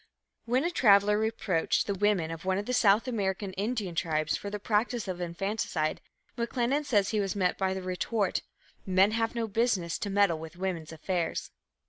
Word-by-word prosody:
When 250 +4 +1
a 345 - 0
traveller 210 - +5
reproached 210 -6 0
the 200 - -1
women 195 -5 +1
of 165 0 -7
one 190 0 +1
of 205 - -3
the 250 - -2
South 220 0 +4
American 195 -4 -2
Indian 205 -1 -2
tribes 155 -2 0
for 200 - -5
the 210 - -3
practice 220 +2 0
of 180 -1 -4
infanticide, 175 -3 -2 0.4
McLennan 245 +4 0
says 205 -8 +2
he 215 - 0
was 195 -1 -1
met 185 -3 +1
by 190 -1 -1
the 190 - -5
retort, 185 +2 -1 0.4
"Men 190 +2 +4
have 225 +1 -1
no 230 -1 -1
business 205 -6 0
to 205 - -3
meddle 195 -5 +3
with 160 +1 -9
women's 180 -4 -3
affairs." 170 +1 -2
200 Hz, 180 wpm, -29 LUFS, 180-220 Hz, 0.4 s, traveller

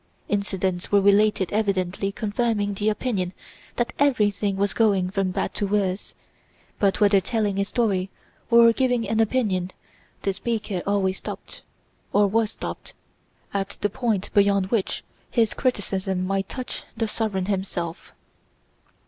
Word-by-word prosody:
Incidents 190 -3 -1
were 205 - +6
related 200 -1 +3
evidently 195 -2 0
confirming 210 -1 -1
the 205 +2 0
opinion 205 -5 -1 0.4
that 240 - -1
everything 210 -7 +2
was 200 0 +1
going 195 -5 +2
from 195 -1 0
bad 185 - -2
to 205 - -1
worse, 195 -1 -1 0.6
but 200 -2 +2
whether 200 -2 +5
telling 205 -1 -1
a - - +3
story 200 -4 0 0.4
or 235 -1 +7
giving 245 -2 +1
an 225 - 0
opinion 210 -6 +1 0.5
the 195 - +1
speaker 205 -2 -2
always 195 -2 +1
stopped, - - -7 0.5
or 205 0 +5
was 215 +2 +2
stopped, - - -7 0.6
at 195 0 -2
the 205 - +1
point 225 -5 -1
beyond 200 -1 +3
which 225 -5 0 0.3
his 225 -3 +2
criticism 195 -6 -1
might 195 0 -1
touch 255 -2 -4 0.2
the 225 -1 0
sovereign 210 -4 -1
himself. 185 -3 -3
200 Hz, 135 wpm, -24 LUFS, 190-220 Hz, 0.6 s, or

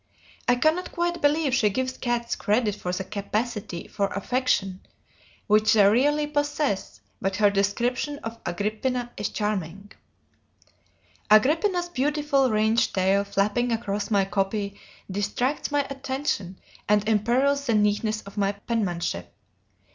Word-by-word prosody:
I 245 - +5
cannot 310 +8 +1
quite 345 0 -1
believe 290 -1 +2
she 225 -5 +3
gives 255 +5 -2
cats 240 -1 -1
credit 210 0 +1
for 180 -3 -4
the 185 +1 -2
capacity 205 -2 -4
for 200 - -1
affection 200 -3 -1 0.7
which 215 0 +4
they 210 -2 +6
really 290 +8 +3
possess, 290 - -2 0.2
but 195 0 -1
her 205 0 +4
description 240 +8 0
of 225 0 -6
"Agrippina" 220 +7 -2
is 205 - -2
charming: 200 -2 -3 1.4
"Agrippina's 325 - +4
beautifully 290 -2 +1
ringed 220 +1 +2
tail 190 +1 +3
flapping 205 +4 0
across 210 -3 -2
my 200 -3 +3
copy 200 +1 -2 0.3
distracts 210 +8 -1
my 290 -1 +1
attention 265 -8 -3 0.3
and 210 0 +3
imperils 255 +6 +2
the 230 - +2
neatness 210 +1 +1
of 200 +1 -13
my 200 0 +1
penmanship. 180 - -3
215 Hz, 125 wpm, -25 LUFS, 200-265 Hz, 1.4 s, they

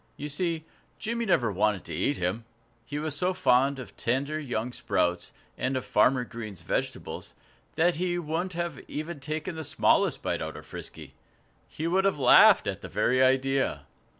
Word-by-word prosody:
You 150 - -5
see, 165 +1 -1 0.3
Jimmy 235 +1 -2
never 120 - +2
wanted 105 0 0
to - - -7
eat 145 - 0
him. 95 +6 -2 0.4
He 140 +5 -6
was 150 -1 -2
so 180 +5 0
fond 140 -5 +3
of 130 - -9
tender 140 +6 -1
young 125 -4 -3
sprouts, 90 -6 -1 0.3
and 130 +1 0
of 130 - -4
Farmer 125 +4 +3
Green's 110 -6 -8
vegetables, - - -4 0.4
that 170 +1 +2
he 175 0 0
wouldn't 175 +3 -2
have 170 -3 -3
taken - - -12 0.5
even 160 +3 -3
the 160 - -5
smallest - - +2
bite - - -1
out - - -5
of - - -11
Frisky. - - -9 0.5
He 155 - -6
would 190 +3 +2
have 195 -5 +2
laughed 130 -3 +7
at - - -3
the - - -8
very 130 +1 +2
idea. 135 +1 +2
140 Hz, 175 wpm, -28 LUFS, 125-170 Hz, 0.5 s, laughed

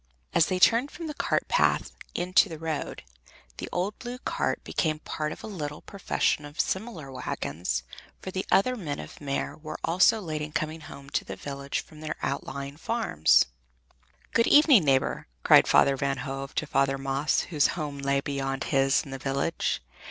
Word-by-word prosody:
As 165 - +4
they 185 - 0
turned 230 +8 +4
from 335 - -8
the 305 - -4
cart - - 0
path - - +2 0.2
into 185 +3 +3
the 160 - -6
road, 160 -1 -4 0.5
the - - -5
old 190 +4 -2
blue 245 0 -6
cart - - -2
became 155 -3 0
part 155 0 -4
of - - -9
a - - -5
little 150 -9 -5
profession 195 -5 0
of 145 +2 -11
similar 190 - -2
wagons, 80 - -3 0.4
for 190 - -6
the 190 +1 -2
other 250 +6 +4
men 155 -11 -4
of - - -9
Meer 140 -1 -2
were 155 0 -7
also 185 +6 +4
late 155 -6 -4
in 150 0 -5
coming 155 +1 -2
home 140 -1 -11
to - - 0
the - - -7
village 140 0 -4
from 155 -1 -15
their 155 - -3
outlying 140 0 -4
farms. 220 - +3 0.9
"Good 230 - +4
evening, 290 - +7
neighbor," 135 -2 +1 0.2
cried - - +7
Father 140 - +5
Van 135 0 -1
Hove 135 0 -5
to - - 0
Father 135 -1 +1
Maes, 135 +2 0
whose 150 -4 +4
home 145 -3 -4
lay 140 0 +1
beyond 135 -1 -2
his 135 0 +2
in 140 - -10
the 135 - -5
village. 140 - -1
150 Hz, 180 wpm, -27 LUFS, 140-185 Hz, 0.9 s, evening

